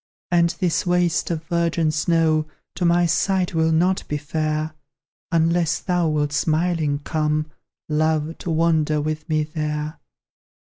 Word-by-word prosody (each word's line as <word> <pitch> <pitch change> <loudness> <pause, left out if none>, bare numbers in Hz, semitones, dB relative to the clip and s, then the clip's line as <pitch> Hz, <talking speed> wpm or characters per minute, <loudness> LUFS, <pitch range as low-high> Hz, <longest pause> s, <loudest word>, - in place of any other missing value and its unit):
And 170 -1 +4
this 175 -3 +1
waste 175 -2 +1
of 165 -2 -2
virgin 170 -1 0
snow 155 -1 +2 0.3
To 180 - -2
my 175 +1 +4
sight 180 +3 +1
will 160 0 +2
not 180 +4 +2
be 150 - -2
fair, 155 +1 -2 0.6
Unless 165 0 +2
thou 180 -3 +1
wilt 145 -1 0
smiling 155 -1 +1
come, 155 0 -1 0.4
Love, 155 +1 0
to - - -5
wander 160 -2 +2
with 155 +2 -3
me 155 -1 +2
there. 150 0 -4
160 Hz, 135 wpm, -22 LUFS, 155-170 Hz, 0.6 s, And